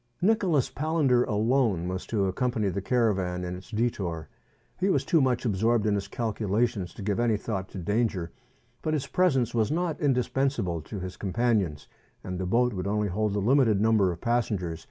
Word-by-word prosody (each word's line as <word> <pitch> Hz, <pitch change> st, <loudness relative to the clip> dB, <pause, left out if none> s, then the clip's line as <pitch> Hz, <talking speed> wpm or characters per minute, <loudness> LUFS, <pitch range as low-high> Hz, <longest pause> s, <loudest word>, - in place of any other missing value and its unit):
Nicholas 185 Hz, -, +2 dB
Palander 145 Hz, -5 st, +2 dB
alone 110 Hz, -5 st, +1 dB
was 95 Hz, +1 st, -4 dB
to 105 Hz, -4 st, 0 dB
accompany 110 Hz, +2 st, 0 dB
the 100 Hz, +1 st, -3 dB
caravan 95 Hz, -6 st, 0 dB
in 90 Hz, 0 st, -4 dB
its 90 Hz, -, -11 dB
detour. 95 Hz, -9 st, -2 dB, 0.5 s
He 190 Hz, +2 st, +1 dB
was -, -, +1 dB
too 165 Hz, -5 st, +3 dB
much 130 Hz, -2 st, +1 dB
absorbed 110 Hz, +1 st, +2 dB
in 105 Hz, -, +2 dB
his 100 Hz, -1 st, -2 dB
calculations 110 Hz, -3 st, -1 dB
to -, -, -7 dB
give 100 Hz, +2 st, -1 dB
any 115 Hz, -3 st, +2 dB
thought 95 Hz, -3 st, -4 dB
to -, -, -9 dB
danger; 95 Hz, -2 st, -1 dB, 0.5 s
but 155 Hz, -1 st, 0 dB
his 140 Hz, -3 st, -2 dB
presence 135 Hz, -5 st, +1 dB
was 115 Hz, -1 st, +1 dB
not 170 Hz, -1 st, -1 dB
indispensable 125 Hz, -, 0 dB
to 95 Hz, +6 st, -7 dB
his 95 Hz, 0 st, -6 dB
companions, 100 Hz, -7 st, 0 dB, 0.4 s
^nd 90 Hz, -1 st, -4 dB
the 95 Hz, -, -2 dB
boat 120 Hz, +4 st, +2 dB
would 95 Hz, 0 st, -3 dB
only 105 Hz, 0 st, 0 dB
hold 105 Hz, +2 st, -1 dB
a -, -, +1 dB
limited 115 Hz, -1 st, +3 dB
number 105 Hz, -3 st, +3 dB
of 85 Hz, -, -7 dB
passengers. 105 Hz, -9 st, -1 dB
110 Hz, 180 wpm, -27 LUFS, 95-125 Hz, 0.5 s, too